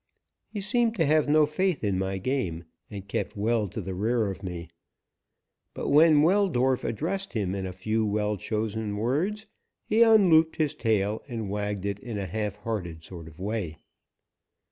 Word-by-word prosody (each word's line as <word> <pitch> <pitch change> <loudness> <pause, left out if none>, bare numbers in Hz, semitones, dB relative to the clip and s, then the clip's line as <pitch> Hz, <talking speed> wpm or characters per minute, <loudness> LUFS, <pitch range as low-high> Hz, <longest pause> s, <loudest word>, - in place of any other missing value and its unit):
He 210 - -5
seemed 230 +2 +1
to 165 -6 +2
have 150 0 +3
no 155 0 +5
faith 175 0 -1
in 100 -3 0
my 95 0 -2
game, 95 -7 -2 0.3
and 100 -2 -8
kept 105 +2 -3
well 110 0 +1
to - - -6
the 95 - -5
rear 110 +2 0
of 95 - -9
me, 90 -3 -6 1.1
but - - -3
when 150 0 +6
Weldorf 160 -9 +2
addressed 190 - -2
him 100 -6 -1
in 95 -1 -3
a - - -5
few 110 +5 -1
well 105 0 0
chosen 110 0 -3
words 165 - -1 0.4
he 220 +2 +2
unlooped 185 -8 +6
his 155 -3 0
tail 105 -1 0
and 115 -6 -4
wagged 105 -1 -3
it 100 0 -2
in 115 -2 -6
a 100 - -3
halfhearted 105 -4 -4
sort 85 -2 -9
of 80 0 -14
way. 95 -5 -3
110 Hz, 165 wpm, -27 LUFS, 100-155 Hz, 1.1 s, when